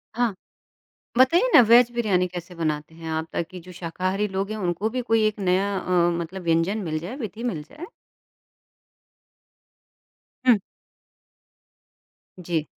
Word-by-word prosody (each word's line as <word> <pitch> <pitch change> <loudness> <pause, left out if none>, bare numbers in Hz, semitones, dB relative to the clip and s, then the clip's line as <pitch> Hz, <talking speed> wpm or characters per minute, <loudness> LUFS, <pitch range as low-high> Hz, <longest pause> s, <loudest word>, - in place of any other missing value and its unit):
हाँ। 240 -2 +1 0.9
बताइए 340 - +5
ना 290 - +11
वेज 240 +1 +7
बिरयानी 200 -6 +1
कैसे 175 0 -8
बनाते 155 -2 -3
हैं 165 0 -8
आप? 160 0 -2
ताकि 180 +2 -4
जो 180 +2 -12
शाकाहारी 185 +4 -2
लोग 195 +2 -1
हैं 215 - -3
उनको 180 +2 -1
भी 250 - 0
कोई 225 -1 +4
एक 215 0 -1
नया 195 +2 +1
अ, 175 -1 +2
मतलब 175 +3 -5
व्यंजन 165 +5 +1
मिल 155 -3 -2
जाए, 180 +11 -7
विधि 225 -4 -6
मिल 155 -4 -5
जाए। 300 - -10 2.6
हुँ। 240 -3 +7 1.8
जी। 165 -3 -2
185 Hz, 135 wpm, -24 LUFS, 170-215 Hz, 2.6 s, ना